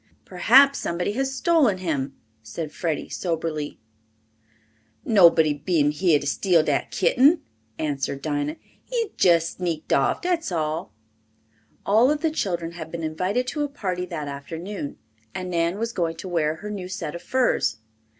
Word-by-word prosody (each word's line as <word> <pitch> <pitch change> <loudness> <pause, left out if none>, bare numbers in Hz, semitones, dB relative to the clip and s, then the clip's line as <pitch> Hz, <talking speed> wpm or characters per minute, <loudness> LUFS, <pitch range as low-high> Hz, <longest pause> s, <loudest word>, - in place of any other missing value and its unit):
"Perhaps 265 +10 +5
somebody 175 +3 -2
has 270 +4 -1
stolen 270 - +3
him," 145 -7 -2 0.3
said 145 +8 -6
Freddie 165 -3 -3
soberly. 160 -4 -3 1.3
"Nobody 170 -8 +5
been 145 0 +1
heah 155 0 +3
to - - -7
steal 170 +3 +3
dat - - 0
kitten," 305 - +3 0.3
answered 140 -2 -2
Dinah. 145 0 -1 0.3
"He's 465 -4 -2
jess 170 -2 +3
sneaked 170 -4 -2
off, 135 - +2
dat's 350 - 0
all." 155 -6 -2 0.9
All 225 +6 +5
of 300 0 0
the 320 -1 +1
children 175 - -2
had 165 -2 -8
been 170 -1 -5
invited 185 +10 -1
to 300 - -3
a 290 - -2
party 185 -9 -3
that 155 -4 -5
afternoon 160 +4 -6 0.4
and 185 -1 -4
Nan 170 +2 0
was 230 +1 -3
going 165 -2 -1
to 165 - -8
wear 160 -3 0
her 210 +6 -7
new 190 -3 -5
set 180 -5 -5
of 170 - -7
furs. 260 -1 +1
175 Hz, 150 wpm, -24 LUFS, 155-210 Hz, 1.3 s, Perhaps